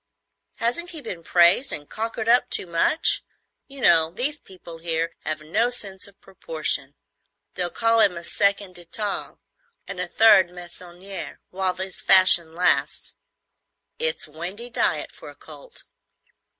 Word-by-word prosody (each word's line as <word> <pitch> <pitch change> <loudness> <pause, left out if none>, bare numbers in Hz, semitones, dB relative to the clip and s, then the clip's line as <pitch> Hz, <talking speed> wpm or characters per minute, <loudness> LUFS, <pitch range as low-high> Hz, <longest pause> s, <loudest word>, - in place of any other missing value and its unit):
Hasn't 245 +10 -2
he 320 -4 -8
been 175 -10 -7
praised 175 +10 +4
and 145 -1 -5
cockered 225 0 -4
up 245 +1 +4
too - - 0
much? 170 - +2 0.5
You 275 -1 -12
know 160 -7 +4
these 265 - -3
people 175 -3 -13
here 165 0 -2
have 155 0 -3
no 215 +10 0
sense 200 -6 -6
of 200 0 -20
proportion. - - -3 0.6
They'll 180 -1 -2
call 230 +3 +1
him 195 -5 +3
a 170 - -8
second 200 0 0
Detaille 200 +4 -5 0.5
and 195 - -7
a 180 - -2
third 210 -2 +5
hand 175 - -19
Meissonier 180 +2 -9
while 185 -1 -2
his 190 0 -4
fashion 180 -4 +6
lasts. 180 +1 0 0.8
It's 480 +1 0
windy 180 +10 -8
diet - - -1
for - - -12
a - - -14
colt." - - -11
190 Hz, 145 wpm, -23 LUFS, 175-230 Hz, 0.8 s, fashion